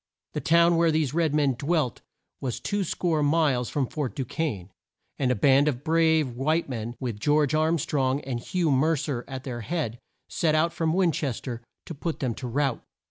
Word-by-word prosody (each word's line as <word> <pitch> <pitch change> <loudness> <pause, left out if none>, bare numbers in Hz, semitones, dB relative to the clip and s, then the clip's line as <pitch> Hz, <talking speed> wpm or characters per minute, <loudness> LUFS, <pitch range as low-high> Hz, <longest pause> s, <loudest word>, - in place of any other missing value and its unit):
The - - -2
town 170 +1 +4
where 170 0 +4
these 155 -4 +1
red 160 -3 +1
men 145 -3 +3
dwelt 145 -1 -1 0.4
was 125 -4 -3
two 205 -1 -1
score 165 -2 0
miles 145 -5 +2
from 140 -3 0
Fort 140 0 -4
Du 135 - -2
quesne, 110 - -3 0.5
and 130 - +1
a 125 - +2
band 135 +6 +4
of 135 -2 -1
brave 160 -3 +3
white 155 +7 0
men, 120 -2 -5
with 120 -6 -4
John 150 +5 +3
Arm 160 +2 +2
strong 135 -2 0
and 130 -4 -4
Hugh 170 +4 0
Mer 155 +5 +3
cer 140 -5 -3
at 130 -1 -6
their 120 -3 -5
head, 130 -4 -3 0.3
set 155 -2 +1
out 165 +2 +2
from 160 -1 0
Win 180 -2 +3
ches 140 -6 -2
ter 120 -3 -5 0.2
to - - -6
put 160 +2 -4
them 125 -4 -1
to 125 - -6
rout. 135 +1 -1
145 Hz, 200 wpm, -26 LUFS, 125-160 Hz, 0.5 s, town